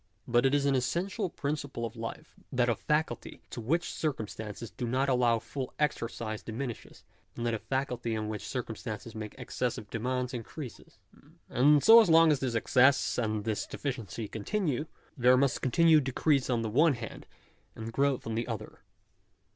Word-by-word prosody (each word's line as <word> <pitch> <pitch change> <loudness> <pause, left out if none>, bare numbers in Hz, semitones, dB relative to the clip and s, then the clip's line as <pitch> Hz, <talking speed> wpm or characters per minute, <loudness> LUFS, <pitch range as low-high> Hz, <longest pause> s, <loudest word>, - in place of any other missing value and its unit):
But 120 +2 +4
it 135 - +2
is 140 -1 +1
an 140 - +3
essential 175 - -1
principle 140 -5 -3
of 115 +1 -7
life 115 +7 -7 0.2
that 125 -2 +2
a - - +4
faculty 150 -3 -2
to 120 - -5
which 165 +10 0
circumstances 110 -6 -4
do 120 - -4
not 130 +3 +1
allow 125 -2 +3
full 130 +3 -6
exercise 115 -6 -2
diminishes; 120 +1 -6 0.3
and 120 - -4
that 120 - +1
a 110 - -1
faculty 125 -3 -2
on 110 0 -3
which 105 -1 -4
circumstances 115 -2 -5
make 110 -1 -7
excessive 120 -5 -3
demands 125 +2 -2
increases. 125 +2 -8 0.5
And 145 +3 +4
so 230 +1 +10
long 165 -5 +6
as 145 - +2
this 125 -3 -2
excess 130 +4 +3
and 110 -3 -1
this 110 -1 -2
deficiency 115 -6 -4
continue, 150 - -2 0.3
there 125 -1 +5
must 140 0 +1
continue 160 +4 +5
decrease 135 +1 +1
on 120 -2 +1
the 110 - -2
one 150 +6 +5
hand, 115 -1 -8 0.5
and 115 0 -6
growth 140 0 +1
on 115 - -3
the 115 +1 -2
other. 110 -3 -6
125 Hz, 165 wpm, -30 LUFS, 115-140 Hz, 0.5 s, so